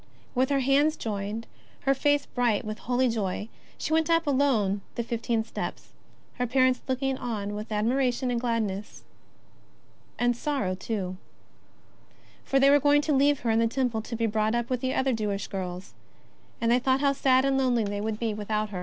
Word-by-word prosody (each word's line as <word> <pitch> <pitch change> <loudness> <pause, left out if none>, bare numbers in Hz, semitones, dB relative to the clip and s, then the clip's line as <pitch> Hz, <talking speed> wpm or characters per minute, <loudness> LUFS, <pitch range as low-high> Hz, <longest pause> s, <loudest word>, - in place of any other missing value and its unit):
With 260 +1 +2
her 280 -1 +2
hands 285 +4 +3
joined, 210 +1 -4 0.4
her 275 - +3
face 290 +1 +2
bright 240 -5 0
with 215 +1 -5
holy 255 +1 +1
joy, 210 -2 -2 0.3
she 315 - -2
went 320 0 +2
up 330 0 +3
alone 255 -9 +2
the 235 - -1
fifteen 230 -1 -1
steps, 225 - -6 0.5
her 250 - +1
parents 255 +1 +3
looking 265 0 -1
on 210 -4 -3
with 210 +2 -6
ad 210 0 0
miration 250 0 +1
and 235 -1 -1
gladness. 215 -4 -2 1.1
And 245 0 +2
with 240 - -14
sorrow, 275 -11 0
too. 185 -1 -4 1.3
For 270 - +2
they 275 +1 +6
were 290 - +6
going 290 +1 +4
to 305 - +1
leave 285 +1 +3
her 230 - +1
in 225 - +3
the 230 - +3
Temple 240 -2 -1
to 230 - -6
be 230 0 0
brought 215 +1 +1
up 240 +1 -2
with 250 -1 -1
other 260 0 +1
Jewish 210 -3 -2
girls, 185 -1 -6 0.7
and 230 0 +1
they 245 - +4
thought 260 +1 +1
how 280 -1 +3
sad 265 -1 +3
and 275 0 +2
lonely 250 -4 +2
they 205 0 -3
would 215 0 -2
be 225 -1 -1
without 210 0 -2
her. 185 - -4
240 Hz, 190 wpm, -27 LUFS, 215-270 Hz, 1.3 s, they